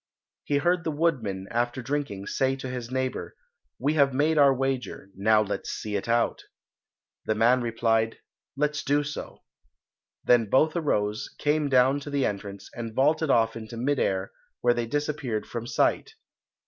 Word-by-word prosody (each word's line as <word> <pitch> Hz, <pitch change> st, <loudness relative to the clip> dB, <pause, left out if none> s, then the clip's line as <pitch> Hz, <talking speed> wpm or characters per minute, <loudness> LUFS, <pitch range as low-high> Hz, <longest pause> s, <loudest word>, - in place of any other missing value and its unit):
He 145 Hz, -, +1 dB
heard 175 Hz, +3 st, +1 dB
the 165 Hz, -, -1 dB
woodman, 125 Hz, -, -1 dB
after 120 Hz, +2 st, -1 dB
drinking, 135 Hz, -8 st, -3 dB
say 135 Hz, +4 st, 0 dB
to 135 Hz, -1 st, -7 dB
his 125 Hz, -2 st, -5 dB
neighbour, 130 Hz, 0 st, -3 dB, 0.4 s
"We 145 Hz, +4 st, 0 dB
have 140 Hz, -4 st, +3 dB
made 150 Hz, +3 st, +2 dB
our 140 Hz, -1 st, +7 dB
wager, 130 Hz, -6 st, -3 dB
now 105 Hz, +2 st, +3 dB
let's 105 Hz, -, -4 dB
see 105 Hz, -1 st, -4 dB
it 100 Hz, +3 st, -3 dB
out." 115 Hz, 0 st, +1 dB, 0.8 s
The 110 Hz, -, 0 dB
man 120 Hz, +4 st, +4 dB
replied, 115 Hz, -1 st, +1 dB, 0.4 s
"Let's 150 Hz, 0 st, 0 dB
do 145 Hz, +1 st, +2 dB
so." 145 Hz, +1 st, -7 dB, 0.8 s
Then 115 Hz, -4 st, +4 dB
both 155 Hz, -, +3 dB
arose, 105 Hz, -10 st, -1 dB
came 150 Hz, 0 st, +1 dB
down 130 Hz, +2 st, +4 dB
to 145 Hz, -, -8 dB
the 140 Hz, -2 st, +1 dB
entrance, 100 Hz, -1 st, -5 dB
and 115 Hz, -2 st, -6 dB
vaulted 155 Hz, +3 st, +2 dB
off 115 Hz, -3 st, +3 dB
into 115 Hz, 0 st, -8 dB
mid 135 Hz, +4 st, 0 dB
air, 95 Hz, 0 st, 0 dB, 0.3 s
where 120 Hz, 0 st, +4 dB
they 120 Hz, -1 st, -2 dB
disappeared 145 Hz, -5 st, -2 dB
from 120 Hz, -1 st, -6 dB
sight. -, -, 0 dB
125 Hz, 160 wpm, -26 LUFS, 115-145 Hz, 0.8 s, our